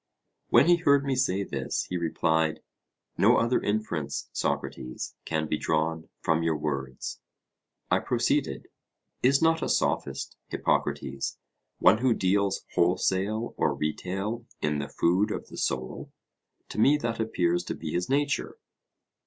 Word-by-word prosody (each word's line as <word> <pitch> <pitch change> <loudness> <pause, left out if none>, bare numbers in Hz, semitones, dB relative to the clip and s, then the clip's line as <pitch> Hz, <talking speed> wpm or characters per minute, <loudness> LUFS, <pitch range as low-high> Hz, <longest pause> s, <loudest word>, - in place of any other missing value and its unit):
When - - +6
he 175 0 +6
heard 140 -4 +3
me 135 -1 +1
say 100 -6 +1
this, 70 -8 -2
he - - -1
replied: 80 -2 +1 0.6
No - - +6
other 115 +2 +2
inference, 105 -8 -2
Socrates, 65 0 -3
can 80 -1 -1
be 75 - -1
drawn 80 +1 -1
from 80 0 +2
your 80 -2 +1
words. 70 -4 -4 0.7
I - - +4
proceeded: - - 0 0.5
Is 135 +4 +4
not 165 0 +3
a - - -1
Sophist, - - -1
Hippocrates, 70 - -1 0.4
one 110 - +5
who 125 -2 +3
deals 100 +1 +1
wholesale 95 +5 +1
or - - +1
retail 95 +9 -3
in 75 -1 0
the 70 - -4
food 90 +5 +2
of - - -5
the - - -10
soul? 65 -1 -3 0.6
To 105 - -5
me 140 +7 +5
that 115 -5 -3
appears 90 -6 +1
to - - -3
be 80 -2 -5
his 90 +6 -1
nature. 140 +1 0
90 Hz, 140 wpm, -28 LUFS, 80-115 Hz, 0.7 s, When